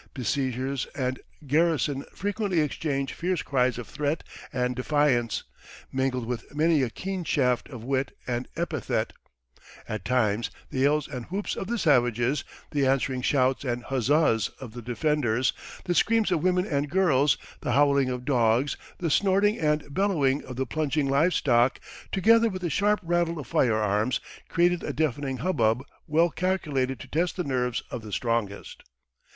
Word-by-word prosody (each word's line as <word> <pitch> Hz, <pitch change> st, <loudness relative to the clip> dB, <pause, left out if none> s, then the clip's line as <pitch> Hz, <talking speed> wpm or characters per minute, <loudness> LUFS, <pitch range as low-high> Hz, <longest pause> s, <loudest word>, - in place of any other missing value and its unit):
Besiegers 130 Hz, +1 st, -1 dB
and 130 Hz, -1 st, -2 dB, 0.3 s
garrison 145 Hz, -2 st, +1 dB
frequently 205 Hz, -2 st, -1 dB
exchanged 140 Hz, -2 st, -1 dB
fierce 180 Hz, -1 st, -1 dB
cries 125 Hz, -3 st, +1 dB
of 120 Hz, -, -6 dB
threat 150 Hz, +1 st, -2 dB, 0.3 s
and 125 Hz, 0 st, -1 dB
defiance, 125 Hz, -3 st, +1 dB, 0.5 s
mingled 130 Hz, -2 st, -1 dB
with 125 Hz, +4 st, -5 dB
many 155 Hz, 0 st, +3 dB
a 130 Hz, -, 0 dB
keen 190 Hz, +8 st, -4 dB
shaft 125 Hz, -6 st, +1 dB
of 125 Hz, -6 st, -8 dB
wit 135 Hz, +1 st, -1 dB
and 120 Hz, 0 st, -2 dB
epithet; 165 Hz, -, -2 dB, 0.7 s
at 110 Hz, -, -4 dB
times 115 Hz, -3 st, +1 dB, 0.2 s
the 130 Hz, -, -2 dB
yells 145 Hz, +3 st, +2 dB
and 125 Hz, -4 st, -6 dB
whoops 195 Hz, +3 st, -3 dB
of 190 Hz, -, -4 dB
the 235 Hz, +2 st, -1 dB
savages, 125 Hz, -, +2 dB, 0.3 s
the 145 Hz, -2 st, +1 dB
answering 130 Hz, -1 st, +1 dB
shouts 130 Hz, 0 st, +2 dB
and 120 Hz, -2 st, -2 dB
huzzahs 130 Hz, -4 st, +2 dB
of 125 Hz, -5 st, -9 dB
the 120 Hz, -, -7 dB
defenders, 125 Hz, 0 st, +1 dB, 0.3 s
the 180 Hz, -, 0 dB
screams 220 Hz, +2 st, +3 dB
of 170 Hz, -4 st, +2 dB
women 180 Hz, +1 st, +2 dB
and 145 Hz, -5 st, -1 dB
girls, 150 Hz, -6 st, +3 dB, 0.2 s
the -, -, -2 dB
howling 140 Hz, -2 st, +4 dB
of 125 Hz, -1 st, -4 dB
dogs, 125 Hz, 0 st, +2 dB, 0.2 s
the 165 Hz, -3 st, -1 dB
snorting 200 Hz, +4 st, +3 dB
and 150 Hz, -2 st, 0 dB
bellowing 150 Hz, -8 st, +1 dB
of 130 Hz, -, -7 dB
the 130 Hz, +2 st, -1 dB
plunging 150 Hz, +1 st, 0 dB
live 150 Hz, +6 st, +3 dB
stock, 120 Hz, -1 st, +3 dB, 0.3 s
together 230 Hz, +4 st, +4 dB
with 185 Hz, -2 st, -6 dB
the 170 Hz, -, -1 dB
sharp 205 Hz, +7 st, +2 dB
rattle 170 Hz, 0 st, 0 dB
of 150 Hz, -, -6 dB
firearms, 110 Hz, 0 st, +1 dB, 0.3 s
created 175 Hz, 0 st, +2 dB
a 145 Hz, -, -3 dB
deafening 140 Hz, -3 st, -1 dB
hubbub 125 Hz, -6 st, +1 dB, 0.2 s
well 165 Hz, +3 st, +3 dB
calculated 150 Hz, -8 st, -1 dB
to -, -, -9 dB
test 170 Hz, +3 st, 0 dB
the 180 Hz, -, 0 dB
nerves 125 Hz, -4 st, -1 dB
of 120 Hz, -, -4 dB
the 105 Hz, -1 st, -9 dB
strongest. 115 Hz, -2 st, -2 dB
140 Hz, 155 wpm, -27 LUFS, 125-165 Hz, 0.7 s, howling